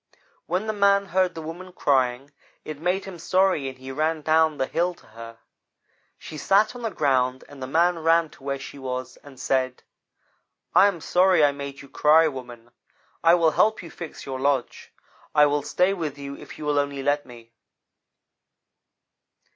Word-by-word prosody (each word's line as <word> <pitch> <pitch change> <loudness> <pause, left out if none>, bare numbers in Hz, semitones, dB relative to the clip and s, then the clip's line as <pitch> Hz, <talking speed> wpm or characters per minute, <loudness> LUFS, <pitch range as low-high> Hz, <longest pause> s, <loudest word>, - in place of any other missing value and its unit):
"When 185 +5 -1
the 215 - -2
man 200 -1 +3
heard 185 -2 0
the 160 - -6
woman 175 +4 -8
crying, 135 -2 0 0.3
it 155 -2 -7
made 180 +4 -1
him 190 -3 -9
sorry 185 -5 +1
and 130 - -11
he 130 +1 -9
ran 155 +2 -1
down 160 -1 +3
the 130 - 0
hill 175 +5 -1
to - - -22
her. 115 +1 -11 0.8
She 155 - -9
sat 205 +6 +3
down 245 - -9
on - - -10
the - - -15
ground, 130 -3 +1
and 145 -2 -13
the 130 - -4
man 170 +4 +2
ran 165 0 +2
to - - -18
where 140 0 -2
she 140 +1 -10
was 130 -1 -5
and 135 -3 -15
said: 130 -1 -1 0.9
"'I 200 - +7
am 185 -5 -3
sorry 180 -2 +4
I 145 - +3
made 140 0 -8
you - - -13
cry, 155 +4 +4
woman. 120 -4 -8 0.5
I 165 +1 +6
will 165 -2 +3
help 215 +4 +2
you 165 - -10
fix 165 -3 -9
your 130 -1 -5
lodge. 135 -2 -1 0.4
I 150 -1 +7
will 145 0 +1
stay 180 +6 +1
with 160 -6 -4
you, 140 0 -7
if - - -12
you 155 - -7
will 145 -1 +2
only 140 -1 -2
let 145 0 0
me.' 115 -2 -14
150 Hz, 185 wpm, -24 LUFS, 135-175 Hz, 0.9 s, I